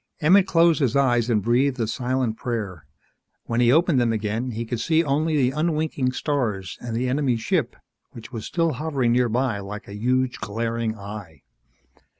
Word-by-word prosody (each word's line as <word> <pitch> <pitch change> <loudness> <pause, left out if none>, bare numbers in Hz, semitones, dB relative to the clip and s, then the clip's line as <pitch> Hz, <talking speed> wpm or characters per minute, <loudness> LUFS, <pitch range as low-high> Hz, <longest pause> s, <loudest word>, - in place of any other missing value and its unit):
Emmett 185 +4 +5
closed 170 -4 +4
his 135 -3 +1
eyes 120 -4 +2
and 105 -4 +1
breathed 125 +3 +2
a 115 - +1
silent 125 0 -1
prayer. 105 - -4 0.6
When 115 +1 -1
he 120 0 +5
opened 160 -2 +3
them 120 -1 +2
again 110 +3 -2
he 115 0 -4
could 115 0 -3
see 160 +7 +2
only 155 +2 +1
the 130 -2 +2
unwinking 155 -4 0
stars 115 - -2
and 120 -2 -4
the 125 +2 0
enemy 130 -2 +1
ship, 110 - -1 0.3
which 120 +1 -11
was 115 -4 -6
still 165 -1 +1
hovering 135 -3 0
nearby 120 -2 +1
like 105 +2 -8
a 100 - -9
huge 125 +4 0
glaring 115 +1 -2
eye. 100 -8 -9
125 Hz, 170 wpm, -23 LUFS, 110-140 Hz, 0.6 s, Emmett